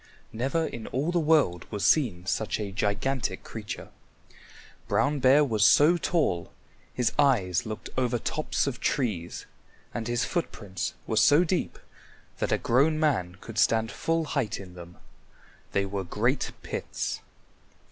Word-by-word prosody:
Never 135 +8 0
in 115 -7 -6
all 145 +7 -1
the 175 - +2
world 150 - +2
was 105 -2 -2
seen 105 - +2
such 110 +3 -1
a 100 -2 -4
gigantic 110 +7 -1
creature. - - -7 1.0
Brown 145 0 +1
Bear 135 +3 +5
was 110 -5 +1
so 150 - +6
tall 155 - 0 0.4
his 125 -3 0
eyes 105 - +2
looked 110 -3 -6
over 125 -2 +1
tops 155 +6 -1
of 135 -3 -3
trees, 105 - -2 0.5
and 115 -1 -3
his 120 0 0
footprints 100 - -3
were 110 - -2
so 145 +9 +6
deep 180 +1 -1 0.6
that - - -1
a - - +3
grown 145 +6 +2
man 95 - +1
could 115 -1 -5
stand 115 0 +3
full 165 0 0
height 140 -8 -2
in 90 -2 -10
them. 90 -1 -11 0.7
They 100 0 +1
were 100 0 -3
great 115 +9 0
pits. - - -4
120 Hz, 145 wpm, -27 LUFS, 100-145 Hz, 1.0 s, so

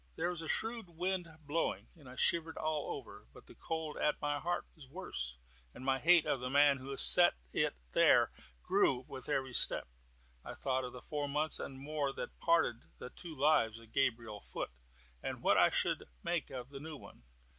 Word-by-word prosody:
There 170 +2 -1
was 175 -2 -5
a 165 - -6
shrewd 225 -1 0
wind 180 +1 -2 0.2
blowing, 155 +3 -1
and 145 -6 -14
I 125 - -10
shivered 165 +3 +2
all 155 -1 -2
over; - - -12
but - - -15
the - - -14
cold 160 -2 -4
at 150 - +1
my 145 0 -1
heart 175 +3 -2
was 150 -5 -14
worse, 65 - -5 0.4
and 130 - -9
my 135 0 +2
hate 170 +1 +5
of 135 - 0
the 125 +1 -4
man 140 0 +5
who 130 +1 -9
had 135 - -4
set 175 - +8 0.2
it - - +1 0.2
there - - +5 0.3
grew 130 -1 +2
with 130 - -7
every 130 -3 -1
step. - - +2 0.6
I - - -7
thought 130 -1 -1
of 125 - -7
the 125 - -10
four 145 -1 -3
months 150 +2 +1
and 135 -1 -6
more 145 0 -2
which - - -5
parted 165 -8 +3 0.2
the 125 - -8
two 165 -3 -6
lives 135 -6 +3
of 115 -1 -15
Gabriel 115 -5 0
Foot, - - -5 0.5
and - - -5
what - - +4
I - - +6
should - - +1 0.2
make 170 -4 -1
of 125 -1 -7
the 140 - -7
new 155 +1 -7
one. - - -14
145 Hz, 200 wpm, -34 LUFS, 130-160 Hz, 0.6 s, set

